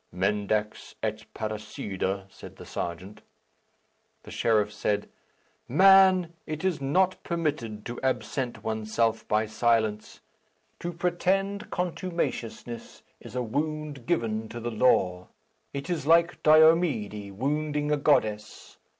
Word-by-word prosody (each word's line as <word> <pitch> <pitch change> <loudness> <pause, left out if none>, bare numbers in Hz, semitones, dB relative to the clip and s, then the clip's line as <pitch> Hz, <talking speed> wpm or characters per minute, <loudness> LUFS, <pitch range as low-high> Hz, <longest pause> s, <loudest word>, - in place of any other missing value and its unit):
"Mendax 105 +3 -1
et - - -3
parricida," 100 -3 -3
said - - -13
the - - -11
serjeant. 90 +4 -6 1.0
The - - -11
sheriff 105 -2 +1
said, 105 -1 -1 0.6
"Man, 185 +2 +6
it 155 +3 -4
is 180 -6 0
not 185 +7 +1
permitted 145 -11 -3
to 120 - -6
absent 130 -1 -2
oneself 110 +1 -1
by 110 +1 +2
silence. 110 -1 0 0.6
To 175 - -4
pretend 190 +4 -1
contumaciousness 170 -10 -4 0.2
is - - -11
a 125 - 0
wound 150 +1 -3
given 110 -1 -1
to 120 - -6
the 120 +1 -4
law. 95 -6 +2 0.4
It 140 0 -5
is 170 -5 -2
like 170 +1 +4
Diomede 155 - +4
wounding 150 +5 -1
a 150 - +3
goddess. 110 -7 0
120 Hz, 115 wpm, -27 LUFS, 110-160 Hz, 1.0 s, Man